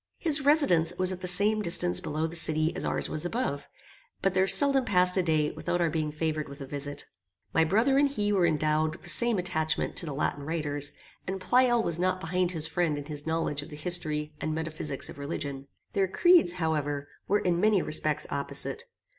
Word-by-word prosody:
His 310 -4 +3
residence 270 - +3
was 185 0 +2
at 185 -1 -7
the 180 - -4
same 205 +4 +4
distance 90 - +3
below 155 +2 -3
the 165 +1 -5
city 160 0 +1
as 190 - -3
ours - - -1
was 155 0 -3
above, 175 - -3 0.6
but 195 - +1
there 190 0 +2
seldom 275 +3 +7
passed 180 -4 +2
a 190 - +2
day 155 -3 0
without 175 - -3
our 170 -2 0
being 155 -1 -2
favoured 155 -1 -3
with 140 +1 -11
a 135 - -7
visit. 145 +1 -4 0.5
My 160 - +3
brother 225 - +2
and 285 0 +3
he 210 -6 -2
were 185 -3 +2
endowed 155 0 0
with 170 - -14
the 175 - -5
same 235 -2 +3
attachment 175 -3 -2
to 170 - 0
the 150 - -5
Latin 145 0 -2
writers; 145 -2 -3 0.3
and 190 +1 -4
Pleyel 240 +4 +2
was 170 -4 0
not 185 +1 0
behind 180 +1 -1
his 160 -3 -2
friend 165 -3 -1
in 145 - -7
his 150 0 -4
knowledge 160 -3 -2
of 145 - -11
the 150 - -9
history 150 -2 +1
and 155 0 -3
metaphysics 155 -3 -3
of - - -11
religion. 140 -2 -6 0.3
Their 195 -1 +1
creeds, 345 - +4
however, 150 -4 -3 0.2
were 205 - +2
in 175 -2 -1
many 210 -3 +2
respects 155 0 +2
opposite. 140 0 -4
165 Hz, 205 wpm, -27 LUFS, 150-185 Hz, 0.6 s, seldom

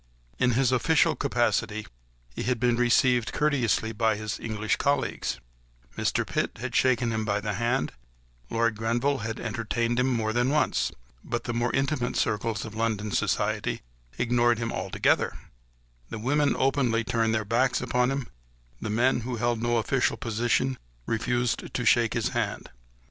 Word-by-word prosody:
In 125 -1 +3
his 130 +1 +2
official 150 +5 +3
capacity 110 -5 0 0.5
he - - -4
had 125 -1 0
been 120 0 +2
received 120 0 +3
courteously 125 -7 +1
by 110 0 +1
his 110 0 -4
English 110 -1 -1
colleagues: 140 -1 -1 0.6
Mr. - - 0
Pitt - - -2
had 125 0 -4
shaken 125 -2 +2
him 110 -1 -1
by 105 -1 0
the 105 0 -3
hand; 120 +4 0 0.6
Lord 115 -1 +1
Grenville 120 +6 0
had 110 +1 -4
entertained 115 +1 -1
him 125 - +2
more 110 -3 0
than 120 +2 +2
once; 150 +1 +1 0.3
but 120 -1 -3
the 120 - -3
more 120 +1 0
intimate 135 -2 0
circles 110 +1 -1
of 110 - -8
London 110 -2 -1
society - - 0 0.3
ignored 120 -1 +2
him 115 0 -2
altogether; - - +1 0.7
the 115 - -5
women 140 +6 +1
openly 125 -4 +2
turned 115 -1 +1
their 110 -1 -1
backs 120 +5 +2
upon 125 0 +1
him; 135 -2 -2 0.5
the - - -3
men 120 +4 +2
who 120 +1 -4
held 120 0 0
no 120 0 +1
official 125 +3 +1
position 120 +3 0 0.3
refused 120 +2 -1
to 120 - -1
shake 115 -1 +4
his - - 0
hand. - - -3
120 Hz, 155 wpm, -27 LUFS, 110-125 Hz, 0.7 s, shake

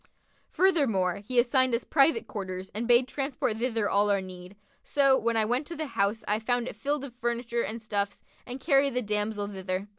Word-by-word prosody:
Furthermore, 250 - +2
he 230 +5 -5
assigned 250 +1 +3
us 235 - -2
private 320 +9 +3
quarters 190 -3 -6
and 230 +3 -3
bade 245 +1 +5
transport 270 -5 -2
thither 230 -3 0
all 205 +1 +2
our 200 -1 +3
need; 185 0 -10 0.3
so, 275 -2 +3
when 235 -3 0
I 220 - +3
went 250 +6 -1
to 340 - -6
the 315 - -3
house 200 +3 0
I 210 +1 +2
found 245 +2 -1
it - - -6
filled 280 +6 -2
full 280 - -5
of 240 - -25
furniture 235 0 -1
and 230 +1 -4
stuffs 205 -2 -3 0.2
and 250 +2 -7
carried 275 -2 +2
the 250 - 0
damsel 210 0 -1
thither. 190 0 -4
230 Hz, 205 wpm, -28 LUFS, 205-260 Hz, 0.3 s, bade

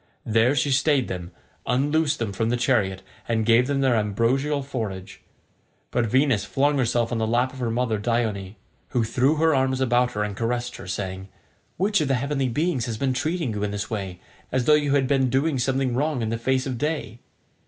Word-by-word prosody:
There 115 +5 +3
she 140 +1 +1
stayed 135 0 +2
them, 90 -2 -5 0.4
unloosed 145 +5 +1
them 110 -4 -3
from 115 +3 -1
the 120 - +1
chariot, 110 -7 +1 0.3
and 110 -1 +1
gave 120 +2 +4
them 140 -1 0
their 130 -3 +3
ambrosial 120 +7 0
forage; 110 -9 -5 0.7
but 120 -2 +1
Venus 130 -3 +2
flung 140 +8 +1
herself 120 -1 +1
on 120 - -1
to - - 0
the - - -3
lap 125 +3 +1
of 130 - -10
her 120 -2 -1
mother 115 -2 0
Dione, 105 -3 -1 0.3
who 120 - 0
threw 130 +6 +2
her 160 +1 +3
arms 130 -1 +1
about 125 -1 +2
her 105 - -1
and 105 -1 -4
caressed 120 +2 -2
her, - - -10
saying, 95 0 -4 0.5
"Which 200 +1 +2
of 150 - 0
the 135 - +2
heavenly 135 0 -1
beings 145 -2 0
has 115 -2 -3
been 130 +2 0
treating 155 -2 -1
you 105 - -4
in 105 - -1
this 100 +1 -4
way, 95 -4 -4 0.3
as 130 -1 0
though 150 - +5
you 145 -2 +3
had 135 -2 +2
been 135 -1 +2
doing 135 +2 +1
something 130 0 0
wrong 140 -1 0
in 110 - -1
the 115 0 -2
face 130 +2 0
of 130 -4 -4
day?" 150 -6 -3
125 Hz, 210 wpm, -24 LUFS, 110-135 Hz, 0.7 s, though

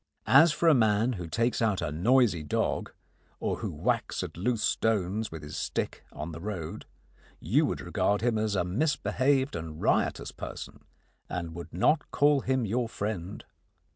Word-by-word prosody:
As 150 +5 +7
for 170 +2 0
a 160 - +8
man 110 -1 +3
who 90 -6 -5
takes 115 +8 0
out 105 -4 +2
a 85 -3 -2
noisy 105 - +3
dog, 75 - -1 0.5
or - - -1
who - - -4
whacks - - -1
at - - -7
loose 110 +6 -1
stones 105 0 0
with 80 -2 -8
his 75 - -7
stick - - -3
on 75 +3 -6
the 80 - -7
road, 90 -6 -5 0.5
you - - +2
would - - -3
regard 105 0 0
him 115 -2 +1
as 110 -1 0
a 90 - +2
misbehaved 135 - +1
and 80 -2 -6
riotous - - +1
person - - -8 0.4
and 85 -2 -4
would 85 +1 -8
not 140 - +2
call 145 0 +4
him 130 -2 0
your 115 +3 -1
friend. 100 -3 -4
105 Hz, 170 wpm, -28 LUFS, 85-125 Hz, 0.5 s, a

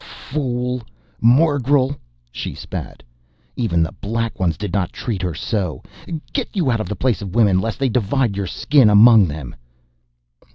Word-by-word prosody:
"Fool! 125 -3 -3 0.4
Morgel!" 140 +1 +3 0.4
she - - -5
spat. - - -7 0.5
"Even 85 -9 +1
the 80 - -3
Black 115 +1 -4
Ones 85 -3 0
did 105 -4 -5
not 95 -3 0
treat 110 -7 -4
her 90 -3 -2
so. 90 -3 -3 0.5
Get 270 -4 -1
you 165 -10 +1
out 115 - 0
of - - -5
the 105 - -3
Place 120 -7 0
of 100 0 -7
Women 100 -5 +4
lest 110 +1 -3
they 135 - +1
divide 120 0 0
your 100 -1 -3
skin 130 - +3
among 105 -1 +7
them!" 75 -4 -6
115 Hz, 160 wpm, -20 LUFS, 95-130 Hz, 0.5 s, among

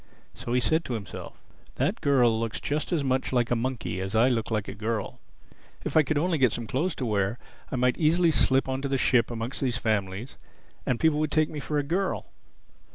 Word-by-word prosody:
So 120 - -5
he 125 - +4
said 160 +6 +1
to 125 - -2
himself, 100 -5 -8 0.4
"That - - -1
girl 125 -5 +3
looks 115 -1 -2
just 150 +4 -2
as 165 -5 +1
much 130 -1 0
like 120 -2 +1
a - - +4
monkey 115 -6 -2
as 95 +3 -4
I 120 +4 +5
look 115 -3 -1
like 105 -3 -1
a - - -5
girl. 105 0 -3 0.7
If - - -3
I 160 - +8
could 155 0 -1
only 165 +1 +1
get 130 -4 +4
some 120 - -4
clothes 150 +10 -1
to 130 - -3
wear 105 0 0 0.3
I - - -1
might 125 0 +1
easily 165 +1 +4
slip 135 -3 +3
on 130 0 -2
to 140 - -2
the 135 0 0
ship 125 -2 +3
amongst 120 +2 -4
these 125 -3 +1
families, 110 0 -2 0.5
and 125 - +1
people 160 -2 +3
would 155 -1 +1
take 155 -1 +2
me 150 - -5
for 150 +1 -2
a 145 - +1
girl. 185 +7 -1
125 Hz, 220 wpm, -27 LUFS, 115-150 Hz, 0.7 s, I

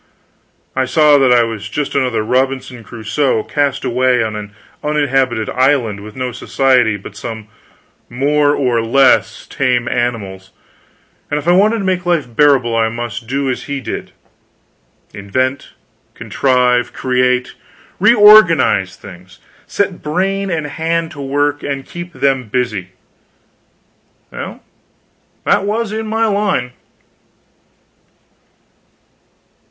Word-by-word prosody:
I 130 - +1
saw 145 +2 +4
that 130 -2 +3
I 120 -1 +5
was 110 -3 -5
just 150 +5 -3
another 125 -5 0
Robinson 130 0 -1
Crusoe 115 +2 -1
cast 145 -2 -1
away 125 -1 +2
on 110 -1 -4
an 105 -1 -7 0.3
uninhabited 135 -6 0
island, 130 -6 +1
with 105 +1 -11
no 130 -1 -3
society 125 -2 +1
but 100 0 -11
some 110 0 -7 0.6
more 145 +3 +1
or 125 -4 +1
less 115 -1 +2
tame 125 -3 -1
animals, 100 -7 -3 0.8
and 145 - -1
if 150 +2 -5
I - - +5
wanted 210 +5 +3
to 205 - -3
make 185 -1 -1
life 170 -5 0
bearable 130 -5 +3
I 115 0 +2
must 115 0 -6
do 135 +2 -2
as 130 - -3
he 140 -1 -4
did - - -6 1.0
invent, 130 +7 -3 0.4
contrive, 125 -2 +1
create, 125 -1 0 0.5
reorganize 195 - +5
things; 90 -2 -14 0.3
set 195 -3 -2
brain 195 +5 -1
and 160 -4 -2
hand 165 +2 -2
to 145 -3 -9
work, 145 +1 -1
and 140 -1 -4
keep 175 0 -8
them 135 -4 0
busy. 110 -5 -2 1.4
Well, - - -8 0.8
that - - +2
was 215 +2 -2
in 220 0 -4
my 225 +1 0
line. 200 - 0
130 Hz, 120 wpm, -16 LUFS, 115-150 Hz, 1.4 s, I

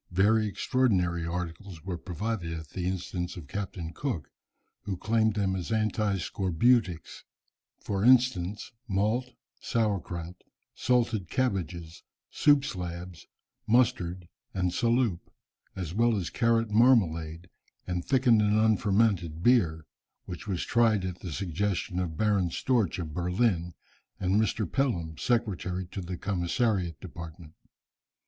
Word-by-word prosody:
Very 105 +4 +3
extraordinary 90 -7 +1
articles 85 0 -5
were 95 -1 -3
provided 90 0 -4
at 80 -2 -7
the 90 +1 -3
instance 90 -1 -3
of 80 -5 -9
Captain 95 -1 -5
Cook, 100 - -4 0.5
who 100 -3 -3
claimed 110 +2 +1
them 95 -2 0
as 90 +3 -4
anti 110 -2 +1
scorbutics, 95 0 +1 0.5
for 100 -1 -3
instance, 115 -6 +3 0.2
malt, 110 +5 0 0.3
sour 110 -4 0
krout, 85 +1 -7 0.3
salted 115 -7 +1
cabbages, 85 -9 -2 0.3
soup 145 -2 +4
slabs, 90 - -6 0.4
mustard 90 -7 +2 0.3
and 90 -1 +1
saloop, 115 -4 +2 0.6
as 90 -4 -4
well 115 +2 +3
as 90 -4 -3
carrot 115 -2 +2
marmalade, 90 -8 +3 0.4
and 90 -1 -2
thickened 125 -5 +4
and 105 0 +3
unfermented 100 -6 +2
beer, 85 -11 +3 0.4
which 90 +2 -8
was 95 -4 -1
tried 110 -5 +3
at 90 -1 -5
the 90 - -6
suggestion 95 +2 -2
of 85 -4 -3
Baron 100 -4 +2
Storch 115 0 0
of 80 -4 -5
Berlin, 90 0 0 0.4
and 95 +3 +2
Mr. 110 0 0
Pelham, 85 - -1
secretary 95 -6 -1
to 100 - -4
the 90 0 -5
Commissariat 95 -2 0
department. 85 -2 -10
95 Hz, 125 wpm, -28 LUFS, 85-110 Hz, 0.6 s, soup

